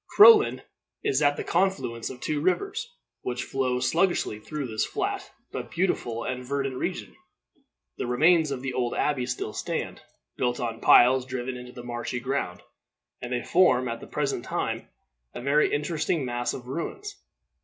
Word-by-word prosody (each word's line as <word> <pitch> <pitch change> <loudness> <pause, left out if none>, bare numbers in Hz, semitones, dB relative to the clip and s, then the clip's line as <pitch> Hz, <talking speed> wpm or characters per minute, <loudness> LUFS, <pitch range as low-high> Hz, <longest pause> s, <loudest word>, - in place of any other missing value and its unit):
Crowland 425 0 +7 0.4
is 135 +2 +1
at 145 -1 +3
the - - -3
confluence 185 -12 0
of 125 - -9
two 150 +2 -2
rivers, 400 - -1 0.3
which 125 0 -3
flow 130 -2 -1
sluggishly 170 - +1
through 150 +6 -5
this 110 -3 -1
flat - - -3 0.2
but - - -5
beautiful 120 -10 -1
and 125 0 -3
verdant 135 0 -2
region. - - -4 0.8
The - - -2
remains 155 +5 +4
of 135 -2 -4
the 135 -1 -3
old 120 -1 -1
abbey 135 -4 0
still 125 -3 -3
stand, - - -3 0.4
built 125 -1 0
on 115 -2 -3
piles 125 +1 +6
driven 130 0 -4
into 125 0 -9
the 125 -1 -10
marshy 120 0 -4
ground, 130 -8 -3 0.6
and 120 - -6
they 125 -1 -1
form 130 -9 +4
at 115 -1 -3
the - - -11
present 140 -5 -2
time - - -3 0.5
a - - -4
very 140 +4 +3
interesting 150 0 0
mass 120 0 -2
of 125 -1 -9
ruins. 395 - -5
130 Hz, 165 wpm, -26 LUFS, 125-155 Hz, 0.8 s, Crowland